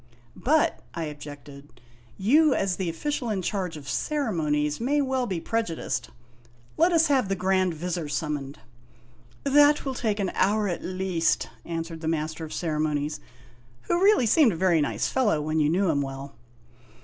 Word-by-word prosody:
"But," 315 +4 +2 0.2
I 165 - -2
objected, 145 -4 -10 0.4
"you 285 +8 +4
as 195 -2 0
the 185 -3 -2
official 245 - -3
in 195 -4 -1
charge 180 -4 -2
of 140 -2 -11
ceremonies 155 - -1
may 285 +5 +1
well 260 -3 0
be 185 -5 -2
prejudiced. 225 -3 -2 0.7
Let 340 +3 +4
us 330 -1 +4
have 265 - +2
the 195 - +1
Grand 185 -1 +1
Vizir 170 -1 -3
summoned." 145 -1 -3 0.9
"That 290 +1 +5
will 270 - -2
take 220 -4 -1
an 195 -3 -1
hour, 210 +2 +2
at 175 - -3
least," 185 -3 0 0.2
answered 165 -1 -5
the 160 - -4
Master 160 0 -2
of 155 - -7
Cere 155 -3 -2
monies, 150 -1 -1 0.6
who 345 - 0
really 405 - +5
seemed 235 - +5
a - - -4
very 170 -2 +3
nice 145 - 0
fellow 225 -11 +1
when 155 +1 -1
you 150 -1 +3
knew 180 +1 +2
him 145 -2 0
well. 135 0 -6
180 Hz, 165 wpm, -26 LUFS, 155-240 Hz, 0.9 s, That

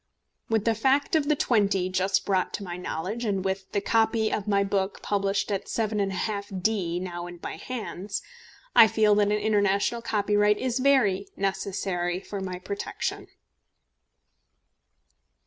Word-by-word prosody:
With 220 -2 +1
the 230 - +3
fact 270 +8 +2
of 300 -2 +2
the 300 - +4
£20 200 -8 +1
just 190 +2 +1
brought 190 -2 0
to 205 - -6
my 175 -2 -5
knowledge, 180 +6 -4
and 195 -4 -1
with 190 0 -3
the 200 - 0
copy 220 0 +2
of 205 - -2
my 200 -1 +3
book 195 0 -2
published 200 0 0
at 200 0 -2
7½d. 200 -3 -1
now 175 -1 -5
in 175 -1 -10
my - - -5
hands, 210 -5 -5 0.5
I 225 - +9
feel 215 -1 +3
that 205 0 +3
an 205 - +1
international 210 +1 +1
copyright 210 -2 +2
is 255 -1 -1
very 245 -8 +3
necessary 190 -2 -1
for 200 0 -6
my 185 -1 -4
protection. 200 +3 -4
200 Hz, 145 wpm, -26 LUFS, 190-220 Hz, 0.5 s, I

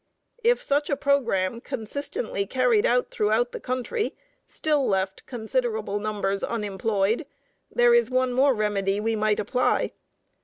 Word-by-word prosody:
If 480 +1 +3
such 290 +1 0
a 285 - +2
programme, 235 -7 +1
consistently 230 -5 -4
carried 250 -4 +3
out 245 +1 +1
throughout 220 +4 +1
the - - -6
country, 255 - -2 0.3
still 300 -3 0
left 190 -1 -1
considerable 220 -3 -2
numbers 205 -2 -2
unemployed, 210 - -1 0.4
there 485 0 +4
is 475 0 +4
one 255 0 +1
more 265 +1 +4
remedy 205 -2 0
we 225 +1 0
might 215 -1 +1
apply. 250 +5 +1
230 Hz, 130 wpm, -25 LUFS, 210-265 Hz, 0.4 s, there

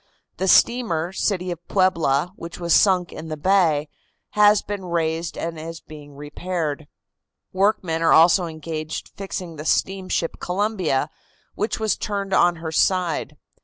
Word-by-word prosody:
The 190 - -1
steamer 185 -6 +3
City 185 -2 -1
of 175 - -5
Puebla, 175 -4 +1
which 170 -2 -9
was 170 -2 +1
sunk 185 -4 +3
in 160 - -8
the 155 -1 -5
bay, 160 -4 +2 0.4
has 210 0 +5
been 205 -1 -5
raised 165 -1 -2
and 165 -1 -4
is 165 +1 -7
being 145 -2 -13
repaired. 150 0 -4 0.7
Workmen 185 -4 +1
are 165 - +3
also 170 +2 +5
engaged 155 -1 -6
fixing 180 -4 -7
the 150 - -6
steamship 185 -2 -1
Columbia, 180 -7 -1 0.4
which 210 +3 -2
was 220 -1 +1
turned 200 -2 -3
on 175 -2 +4
her 160 -1 -6
side. 170 -3 0
170 Hz, 140 wpm, -22 LUFS, 160-190 Hz, 0.7 s, has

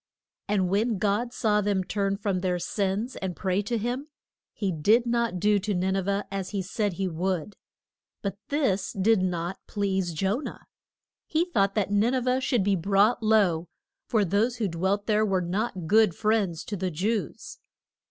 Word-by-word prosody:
And 200 -3 +1
when 210 +4 +1
God 210 +5 0
saw 210 -3 +1
them 200 -2 0
turn 195 +1 -1
from 200 -2 -1
their 180 -1 0
sins 200 +6 -2
and 185 -2 -4
pray 190 0 0
to 230 +3 -2
him, 245 +6 -3 0.4
he 200 -3 -2
did 210 +10 +3
not 235 -5 0
do 210 +2 +3
to 205 +1 -2
Nin 190 +2 0
e - - +2
veh 200 +2 -1
as 195 -1 -3
he 200 -2 -2
said 205 +2 -1
he 190 +2 -2
would. 180 +2 -2 0.7
But 200 0 -3
this 270 -10 0
did 200 +1 +3
not 180 0 -2
please 195 -3 -1
Jo 190 +7 0
nah. 300 - -6 0.7
He 325 +2 +1
thought 200 - +1
that 200 -2 0
Nin 215 +5 +3
e - - +2
veh 255 +1 +1
should 245 -6 +1
be 200 0 +2
brought 200 +6 +3
low, 200 -7 +3 0.4
for 215 -3 +2
those 210 +7 +1
who 225 -4 -1
dwelt 190 +4 -1
there 215 -1 +2
were 195 -3 +1
not 185 +1 -2
good 215 0 +4
friends 210 -6 0
to 210 - -5
the 185 -1 -2
Jews. 195 +3 -3
200 Hz, 180 wpm, -27 LUFS, 185-220 Hz, 0.7 s, good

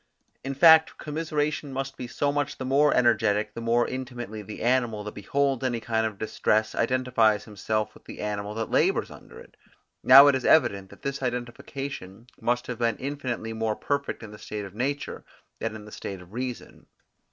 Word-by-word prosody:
In 135 0 -4
fact, 160 +2 +7
commiseration 150 -1 -2
must 135 0 -4
be 125 - -6
so 140 +3 0
much 145 -1 -2
the 130 - -5
more 140 +3 +4
energetic, 110 -3 +2
the 115 - -6
more 115 +1 +2
intimately 125 -4 -6
the 105 +1 -8
animal, 120 -3 +1
that 105 - -6
beholds 135 +5 0
any 120 -2 0
kind 110 0 0
of 105 -2 -8
distress, 110 0 0
identifies 115 -3 +2
himself 110 0 -2
with - - -19
the - - -10
animal 105 0 -3
that 115 0 -3
labours - - +2
under - - -13
it. - - -16 0.5
Now 135 +2 +10
it 145 - +6
is 130 -1 -1
evident 100 -10 +3
that 100 - -16
this 140 0 -3
identification 120 -3 -5
must 120 0 0
have 125 -2 -6
been 115 -2 +1
infinitely 130 -5 -4
more 110 -1 -1
perfect 140 -1 -3
in 110 - -9
the 105 - -11
state 105 -1 -6
of 95 - -10
nature 135 +6 -3 0.4
than - - -3
in 105 -1 -9
the 105 - -12
state 95 -2 -6
of 90 +2 -15
reason. 125 0 -6
120 Hz, 185 wpm, -26 LUFS, 110-135 Hz, 0.5 s, Now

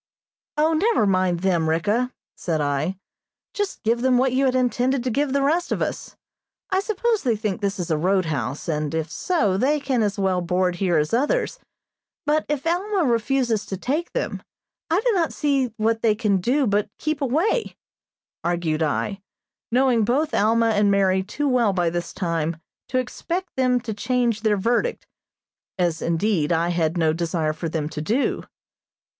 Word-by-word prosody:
"O, 310 +2 +3
never 390 - +2
mind 185 -3 +1
them, 175 -4 +1
Ricka," 210 +10 +1 0.2
said 165 -3 -2
I, 145 +5 -1 0.6
"just 410 -2 -3
give 235 +2 +1
them 255 -1 +3
what 255 0 +2
you 270 +1 +2
had 260 -1 +2
intended 255 +1 +1
to 250 - -1
give 280 +3 0
the 280 0 +1
rest 330 +5 +1
of - - 0
us. - - -4 0.6
I 375 - +3
suppose 435 +2 0
they 240 -4 +1
think 210 -2 -3
this 200 +1 -1
is 175 -3 -3
a 155 - +1
roadhouse, 160 -6 -1
and, 150 -1 -1
if 160 0 -2
so, 215 - +1
they 285 +7 +2
can 265 -4 0
as 205 -1 0
well 190 -2 +1
board 180 +1 0
here 175 -3 +1
as 150 +4 0
others; 295 - +1 0.7
but 300 +1 +1
if 295 -1 -2
Alma 370 +3 +1
refuses 235 -3 +1
to 190 - -4
take 295 - -2
them, - - -2 0.5
I 335 +5 +2
do - - +4
not 345 -6 +1
see 275 -5 +1
what 225 +1 +1
they 220 -2 +3
can 210 -3 +1
do 260 +10 +1
but 205 -1 +1
keep 310 -1 -2
away," 320 - 0 0.7
argued 170 -2 -1
I, 190 +6 -1 0.5
knowing 250 -2 +3
both 285 +8 +1
Alma 225 +2 +3
and 205 -1 +3
Mary 190 -1 +3
too 245 +10 -3
well 240 -6 +3
by 175 -3 +1
this 175 0 -3
time 165 -3 -2 0.3
to 255 - 0
expect 335 +8 -3
them 255 -1 +2
to 225 -2 -4
change 235 0 0
their 215 -2 +2
verdict, 240 - 0 0.7
as, 175 -3 0
indeed, 170 -1 0
I 170 +1 +2
had 170 -1 0
no 160 -2 +2
desire 165 -2 -1
for 160 +1 -4
them 155 -2 -2
to 150 - -5
do. 230 - 0
220 Hz, 175 wpm, -23 LUFS, 175-270 Hz, 0.7 s, do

